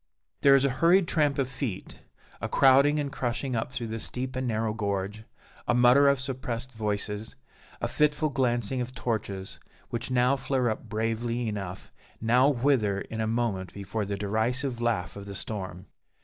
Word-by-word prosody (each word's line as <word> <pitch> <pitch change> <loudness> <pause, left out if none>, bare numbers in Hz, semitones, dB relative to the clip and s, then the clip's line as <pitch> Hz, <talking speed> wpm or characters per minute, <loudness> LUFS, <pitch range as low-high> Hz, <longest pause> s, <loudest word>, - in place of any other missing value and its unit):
There 140 -1 +7
is 135 0 +4
a - - +3
hurried 175 +2 +5
tramp 150 -5 +2
of 135 -2 +1
feet, 125 -6 -5 0.4
a - - -2
crowding 140 +3 +5
and 140 -1 -2
crushing 125 +1 -2
up 115 +2 -2
through 125 -2 -4
the 110 0 -4
steep 130 +3 -4
and 130 0 -1
narrow 110 -1 0
gorge, 100 0 -3 0.4
a 120 - +3
mutter 125 +3 +6
of 140 -1 +4
suppressed 130 -1 -4
voices, 105 0 -2 0.4
a - - -1
fitful 150 0 +2
glancing 125 -2 0
of 125 +1 -5
torches, 105 -6 -3 0.3
which 120 +2 -4
now 125 +1 +3
flare 130 -2 0
up 110 +1 -6
bravely 115 +2 -1
enough, 100 -3 -5 0.3
now 125 +5 +4
wither 120 -7 +2
in 110 0 -5
a 110 - 0
moment 110 -5 -1
before 100 +2 -3
the 100 0 -3
derisive 120 +5 -1
laugh 115 -6 0
of 100 0 -8
the 100 - -6
storm. 95 -3 -5
120 Hz, 170 wpm, -28 LUFS, 105-130 Hz, 0.4 s, There